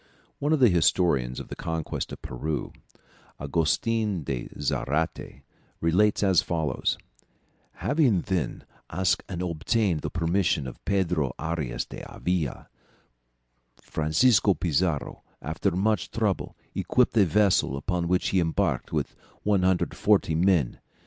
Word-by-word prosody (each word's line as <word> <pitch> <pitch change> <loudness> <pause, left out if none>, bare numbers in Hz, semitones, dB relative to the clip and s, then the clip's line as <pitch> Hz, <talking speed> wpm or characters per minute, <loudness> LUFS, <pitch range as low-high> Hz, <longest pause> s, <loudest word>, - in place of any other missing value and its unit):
One 145 +2 0
of 155 - +3
the 125 -3 +6
historians 80 -7 +2
of - - -9
the - - -6
conquest 80 -1 -4
of - - -9
Peru, 70 +2 -4 0.7
Augustin 85 +6 0
de 65 -3 -4
Zarate, 75 -1 -2 0.4
relates 105 +6 +2
as 95 -3 +4
follows: 80 -6 -1 0.8
"Having 135 - +2
then 90 -9 -2 0.3
asked 95 -1 +1
and 90 -1 -3
obtained 90 +2 0
the - - -4
permission 85 -2 0
of 65 - -9
Pedro 90 -9 0
Arias 80 -5 -3
d'Avila, 90 -7 -3 1.1
Francisco 95 - +3
Pizarro 80 -4 -1 0.2
after - - -1
much 100 +2 0
trouble - - -1 0.2
equipped 125 -2 +1
a 105 - +6
vessel 90 -6 +2
upon 85 +3 -2
which 90 +1 +1
he 95 - +2
embarked 80 -4 0
with - - -2 0.3
140 95 -1 +2
men. 85 -5 +2
85 Hz, 115 wpm, -26 LUFS, 75-100 Hz, 1.1 s, the